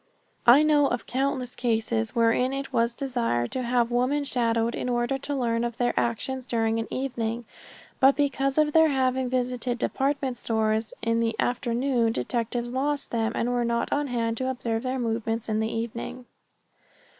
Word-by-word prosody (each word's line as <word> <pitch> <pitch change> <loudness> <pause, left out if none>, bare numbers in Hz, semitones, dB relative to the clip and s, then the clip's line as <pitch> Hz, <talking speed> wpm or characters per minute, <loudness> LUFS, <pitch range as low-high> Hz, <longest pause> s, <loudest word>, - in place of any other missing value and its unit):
I 260 +6 +8
know 295 -2 +4
of 245 - -2
countless 260 -1 -1
cases 225 -1 0
wherein 235 +3 +2
it 275 0 -5
was 235 0 +1
desired 235 - -1
to 260 - -2
have 240 -1 +1
women 255 +4 +1
shadowed 230 -3 +1
in 250 - -3
order 240 +2 0
to 285 +1 -4
learn 235 -3 0
of 235 -1 -3
their 245 -1 +1
actions 255 +2 -1
during 225 -1 0
an 225 - -5
evening, 240 -3 -3 0.5
but 270 +1 +6
because 275 -1 0
of 305 -1 +3
their 320 0 +6
having 260 -2 +1
visited 250 -1 -1
department 270 0 -1
stores 220 -1 0
in 230 0 +1
the 230 -1 0
afternoon 245 -1 +1
detectives 235 - -2
lost 280 +3 -1
them 225 -1 0
and 240 - 0
were 245 -1 +1
not 235 0 0
on 290 0 0
hand 230 -2 -1
to 260 +2 -1
observe 235 -3 -2
their 255 +1 -2
movements 225 -1 -2
in 215 -1 0
the 220 0 -1
evening. 235 +2 -5
245 Hz, 170 wpm, -26 LUFS, 230-265 Hz, 0.5 s, I